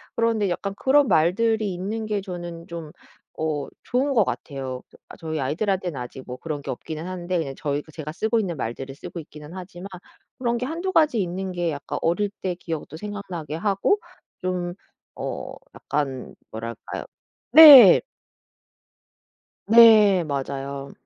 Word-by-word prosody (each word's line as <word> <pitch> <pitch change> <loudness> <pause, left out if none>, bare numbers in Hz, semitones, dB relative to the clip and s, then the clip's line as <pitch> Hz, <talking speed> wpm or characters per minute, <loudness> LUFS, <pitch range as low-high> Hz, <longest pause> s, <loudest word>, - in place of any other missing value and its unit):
그런데 225 -4 +1
약간 195 +3 -3
그런 275 +5 +3
말들이 215 +6 +2
있는 210 +5 -4
게 210 -2 -1
저는 175 -3 -7
좀 165 -3 -7 0.5
어 155 -3 -2 0.2
좋은 270 +3 0
것 220 -6 +4
같아요. 135 -6 -5
저 - - -18 0.2
저희 160 -1 -4
아이들한테는 175 +2 -1
아직 125 +2 -7
뭐 125 - -5
그런 150 -1 -5
게 - - -9
없기는 155 +6 -6
한데 180 -1 -3
그냥 140 -4 -3
저희 145 -1 -2
제가 155 -1 -6
쓰고 220 +7 0
있는 175 -6 -4
말들을 135 +3 -5
쓰고 155 +4 -8
있기는 150 +1 -12
하지만 185 0 -9 0.5
그런 240 -2 -1
게 250 - -3
1-2 340 +7 -3
가지 300 - +3
있는 185 +1 -3
게 175 -2 -1
약간 145 - -5
어릴 175 +5 +1
때 180 -2 -1
기억도 160 -3 -6
생각나게 180 -6 -6
하고 200 - +1 0.4
좀 180 -1 -2 0.4
어 - - -5 0.2
약간 135 -3 -3 0.2
뭐랄까요 115 0 -6 0.5
네. 275 - +11 1.7
네. 215 -5 +7
맞아요. 140 -1 -4
175 Hz, 280 characters per minute, -24 LUFS, 150-210 Hz, 1.7 s, 네